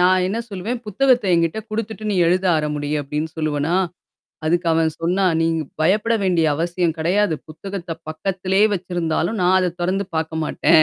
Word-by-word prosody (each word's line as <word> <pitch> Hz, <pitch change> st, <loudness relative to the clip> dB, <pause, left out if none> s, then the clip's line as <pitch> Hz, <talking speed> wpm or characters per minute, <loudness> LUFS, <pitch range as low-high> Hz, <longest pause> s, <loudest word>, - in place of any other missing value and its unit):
நான் 185 Hz, 0 st, +4 dB
என்ன 220 Hz, +4 st, -2 dB
சொல்லுவேன், 210 Hz, +5 st, -3 dB
புத்தகத்த 250 Hz, +2 st, +3 dB
என்கிட்ட 165 Hz, +4 st, +1 dB
குடுத்துட்டு 220 Hz, 0 st, -4 dB
நீ -, -, 0 dB
எழுத 185 Hz, +2 st, +2 dB
ஆரம்பி 150 Hz, -1 st, -1 dB
அப்பிடின்னு 150 Hz, +3 st, -4 dB
சொல்லுவனா! 155 Hz, +1 st, 0 dB, 0.7 s
அதுக்கு 170 Hz, +2 st, +1 dB
அவன் 160 Hz, 0 st, +2 dB
சொன்னா, 180 Hz, +4 st, +1 dB, 0.2 s
"நீங்க 165 Hz, 0 st, +1 dB, 0.2 s
பயப்பட 210 Hz, +8 st, +3 dB
வேண்டிய 175 Hz, -4 st, +2 dB
அவசியம் 170 Hz, +1 st, 0 dB
கிடையாது. 180 Hz, +3 st, +2 dB
புத்தகத்த 175 Hz, +2 st, -7 dB, 0.2 s
பக்கத்திலேயே 190 Hz, +5 st, +1 dB
வச்சிருந்தாலும் 175 Hz, +2 st, -1 dB
நான் 180 Hz, +1 st, +4 dB
அத 180 Hz, -1 st, +1 dB
தொறந்து 190 Hz, +3 st, 0 dB
பார்க்க 160 Hz, 0 st, -2 dB
மாட்டேன்." 155 Hz, +1 st, +4 dB
175 Hz, 150 wpm, -21 LUFS, 160-195 Hz, 0.7 s, நான்